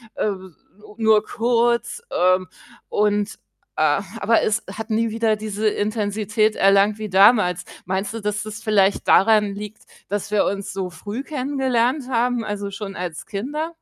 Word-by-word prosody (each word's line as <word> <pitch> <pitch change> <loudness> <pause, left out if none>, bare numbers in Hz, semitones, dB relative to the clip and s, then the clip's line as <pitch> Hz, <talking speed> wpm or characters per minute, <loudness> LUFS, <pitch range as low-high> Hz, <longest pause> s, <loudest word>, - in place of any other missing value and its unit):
äh, - - 0
s 190 -4 -6 0.4
nur 220 -1 +3
kurz, 235 - 0
ähm, 185 0 +2 0.4
und, 210 0 +1 0.4
äh 155 +1 +3 0.2
aber 225 +2 +3
es 215 +2 0
hat 225 +2 -7
nie 225 +1 +1
wieder 225 -1 +1
diese 215 0 -2
Intensität 215 0 0
erlangt 200 +2 +4
wie 215 -1 -5
damals. 190 -2 +4 0.2
Meinst 190 +3 -2
du, 225 - -5
dass 210 +1 -2
das 215 0 -8
vielleicht 200 -2 +2
daran 210 0 +4
liegt, 210 +1 -8 0.3
dass 205 0 -3
wir 210 - +3
uns 195 0 -3
so 190 -2 -3
früh 210 +9 -6
kennengelernt 265 -2 -1
haben, 245 -1 +1
also, 205 -1 -4
schon 195 -1 -6
als 175 -3 -5
Kinder? 290 +11 -3
210 Hz, 150 wpm, -22 LUFS, 200-230 Hz, 0.4 s, erlangt